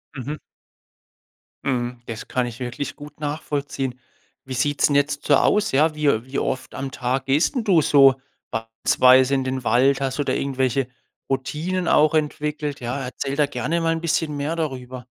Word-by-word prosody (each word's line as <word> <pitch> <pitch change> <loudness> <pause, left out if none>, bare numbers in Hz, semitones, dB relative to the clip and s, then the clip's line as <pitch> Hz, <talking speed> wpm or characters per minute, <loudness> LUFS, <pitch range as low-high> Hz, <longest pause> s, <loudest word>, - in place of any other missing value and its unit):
Mhm. 140 +3 -5 1.3
Mhm, 125 -2 -2
das 110 -2 -6
kann 125 -1 0
ich 120 0 -8
wirklich 125 +3 -4
gut 150 0 -12
nachvollziehen. 145 -3 -3 0.5
Wie 130 - -6
sieht's 145 +4 +2
'n 145 - +1
jetzt 145 0 +1
so 145 - +5
aus, 210 +9 +2
ja? 155 +4 +3
Wie, 150 -1 -1
äh 115 -4 +2
wie 130 +1 -3
oft 130 - -3
am 135 0 -5
Tag 130 +1 -2
gehst 145 - +2
'n 250 - 0
du 185 -6 +4
so 135 -2 +5 0.3
beispielsweise 125 +4 +3
in 135 - 0
den 130 0 -3
Wald? 135 +3 +3
Hast 135 -1 -1
du - - +2
da - - -1
irgendwelche 130 -1 0 0.4
Routinen 160 +7 -2
auch 155 +1 +4
entwickelt? 150 -1 -2
Ja, 125 +3 -3
erzähl 135 +1 -4
da 150 0 +3
gerne 145 +4 -2
mal 165 0 +2
'n 165 - -3
bisschen 160 -2 0
mehr 145 +3 -2
darüber. 130 -6 -5
140 Hz, 180 wpm, -22 LUFS, 130-150 Hz, 1.3 s, so